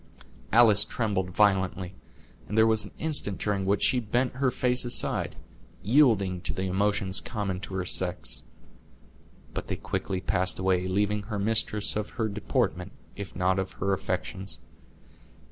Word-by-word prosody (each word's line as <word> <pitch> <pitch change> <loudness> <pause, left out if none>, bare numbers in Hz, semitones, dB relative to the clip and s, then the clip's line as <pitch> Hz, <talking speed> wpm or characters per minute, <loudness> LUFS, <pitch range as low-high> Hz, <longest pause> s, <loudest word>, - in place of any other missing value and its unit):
Alice 110 -3 +7
trembled 100 -5 -2
violently, 95 -2 +1 0.5
and 105 - -4
there 110 - +6
was 110 -1 +3
an - - -11
instant 145 -11 0
during 100 -2 -1
which 100 +1 +2
she 130 - +4
bent 125 +3 -1
her 135 -1 +2
face 125 0 +1
aside, 120 - +1 0.5
yielding 100 -7 +3
to - - -3
the 95 - -2
emotions 95 0 +1
common 100 -5 -3
to 95 - -7
her 90 -1 -2
sex; 75 -10 -1 1.1
but - - -5
they - - -2
quickly 95 - -3
passed 90 -1 +1
away, 95 -1 +1
leaving 105 +2 0
her 105 +1 -5
mistress 105 0 +1
of 105 0 -2
her 110 -2 +1
deportment, 100 -3 -2 0.2
if 100 -4 -8
not 90 +1 +1
of 95 0 -4
her 100 +1 -1
affections. 95 -3 -3
100 Hz, 150 wpm, -27 LUFS, 95-110 Hz, 1.1 s, Alice